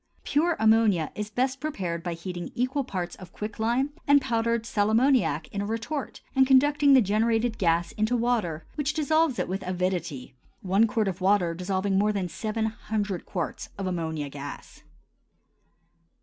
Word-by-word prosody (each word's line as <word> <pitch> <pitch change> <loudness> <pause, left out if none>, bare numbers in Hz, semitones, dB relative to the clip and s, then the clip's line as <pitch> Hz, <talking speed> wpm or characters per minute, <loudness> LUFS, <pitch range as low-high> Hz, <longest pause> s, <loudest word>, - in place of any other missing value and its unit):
Pure 325 +3 +1
ammonia 220 -7 +3
is 210 0 -5
best 260 +4 -1
prepared 190 - -3
by 175 0 -3
heating 175 +1 -6
equal 255 +3 0
parts 180 -8 -4
of 185 -2 -12
quicklime 230 +7 -1 0.2
and 285 0 +7
powdered 230 -2 0
sal 210 -2 +1
ammoniac 225 - +2
in 200 - -3
a - - -2
retort, 230 +6 -4
and 265 -1 +5
conducting 285 +2 +5
the 260 -3 +7
generated 225 +3 +1
gas 170 -1 +2
into 220 +3 0
water 220 -10 -1
which 295 0 -1
dissolves 315 -3 +2
it - - -1
with 190 +2 -3
avidity, 180 -8 -3 0.3
one 195 +4 +3
quart 220 -1 0
of 185 0 -3
water 185 -3 +3
dissolving 190 +2 0
more 210 +1 +3
than 195 -3 -2
seven 215 +6 -3
hundred 210 -4 -3
quarts 175 -4 -4
of 195 - -3
ammonia 160 -5 -2
gas. 140 0 -9
210 Hz, 160 wpm, -26 LUFS, 180-245 Hz, 0.3 s, and